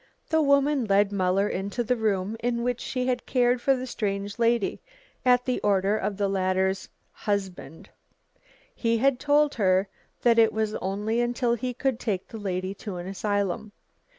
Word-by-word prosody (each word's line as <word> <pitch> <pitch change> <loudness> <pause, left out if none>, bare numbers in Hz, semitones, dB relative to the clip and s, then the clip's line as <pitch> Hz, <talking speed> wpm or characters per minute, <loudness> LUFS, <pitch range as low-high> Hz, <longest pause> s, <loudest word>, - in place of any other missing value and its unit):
The 320 0 +3
woman 280 -2 +3
led 200 0 +3
Muller 195 0 +1
into 200 +6 -2
the 250 +2 +1
room 210 -2 -1
in 235 0 -1
which 245 0 -1
she 255 -1 -2
had 250 -1 -1
cared 245 -1 +2
for 270 +1 +3
the 255 0 -4
strange 200 -3 -3
lady 235 -2 +1 0.4
at 250 -1 +4
the 255 - 0
order 200 0 +2
of 205 -2 -2
the 200 -1 +1
latter's 190 0 0 0.2
"husband." 190 -7 -4 0.9
He 230 -1 0
had 260 +1 +2
told 295 0 +3
her 190 -2 +2 0.4
that 235 -1 +5
it 225 -1 +5
was 220 -1 -1
only 210 +5 -1
until 240 0 0
he 245 +1 -3
could 265 -2 -1
take 195 -6 -2
the 225 - -8
lady 185 -1 -3
to 205 -4 -5
an 175 - -6
asylum. 205 +1 -2
220 Hz, 170 wpm, -26 LUFS, 195-245 Hz, 0.9 s, that